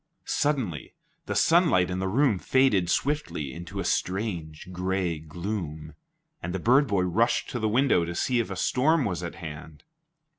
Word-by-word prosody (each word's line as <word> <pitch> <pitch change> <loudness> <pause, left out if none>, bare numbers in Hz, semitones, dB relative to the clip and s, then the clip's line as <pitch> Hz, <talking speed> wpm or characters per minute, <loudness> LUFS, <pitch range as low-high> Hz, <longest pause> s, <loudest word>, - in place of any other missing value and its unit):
Suddenly 130 - -1 0.3
the - - -2
sunlight 160 - +4
in 90 - -2
the 95 - -1
room 115 -1 +2
faded 105 -10 +2
swiftly 135 - -1
into 85 +4 -7
a - - -1
strange 90 -5 -2
gray 90 -2 -1
gloom, 80 -1 -5 0.5
and 90 - -4
the - - -1
bird 130 - +4
boy 100 -4 +1
rushed 100 +7 +1
to 120 - -3
the 110 -1 0
window 120 -6 +3
to 85 +1 -5
see 125 +5 +1
if 115 - -1
a 95 - -4
storm 145 - +2
was 90 -5 -2
at 85 - -6
hand. 80 -2 -9
95 Hz, 170 wpm, -26 LUFS, 85-120 Hz, 0.5 s, sunlight